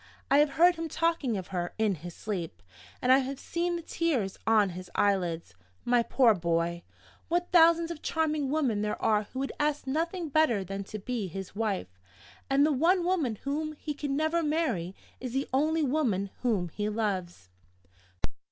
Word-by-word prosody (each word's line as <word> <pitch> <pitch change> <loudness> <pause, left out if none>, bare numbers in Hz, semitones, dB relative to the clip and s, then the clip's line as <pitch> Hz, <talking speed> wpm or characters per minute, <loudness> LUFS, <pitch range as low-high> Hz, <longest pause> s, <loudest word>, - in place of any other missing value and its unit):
I 280 - +6
have 295 -1 +3
heard 350 +1 +5
him 325 0 -4
talking 320 -9 0
of 185 - -6
her 175 -2 -3
in 220 -2 +2
his 175 0 -8
sleep, 175 - -5 0.4
and 250 - +4
I 260 - +7
have 270 +1 -3
seen 345 +1 -2
the 340 - -5
tears 270 - -1
on 215 -3 +4
his 180 0 -8
eyelids. 175 - 0 0.3
My 240 0 +4
poor 235 -1 +4
boy! 170 -1 -1 0.5
What 350 +1 0
thousands 335 -1 +5
of 325 - -7
charming 310 -3 0
women 265 -8 +1
there 210 0 -2
are 210 -1 +2
who - - -8
would 275 +1 -2
ask 295 -1 0
nothing 330 +4 -2
better 270 -9 +3
than 195 +2 -5
to 215 - -6
be 215 0 -3
his 190 +2 -7
wife! 195 - -2 0.5
And 275 +1 +4
the 310 - +2
one 340 +6 +3
woman 325 -11 +1
whom 305 +2 -2
he 300 0 -5
can 285 -1 -3
never 315 +3 +1
marry 300 - -1 0.2
is 250 -2 -5
the 270 +1 -1
only 310 +4 +2
woman 245 -9 0
whom 205 -8 0
he 210 +5 -3
loves! 185 - -3
255 Hz, 180 wpm, -29 LUFS, 195-310 Hz, 0.5 s, I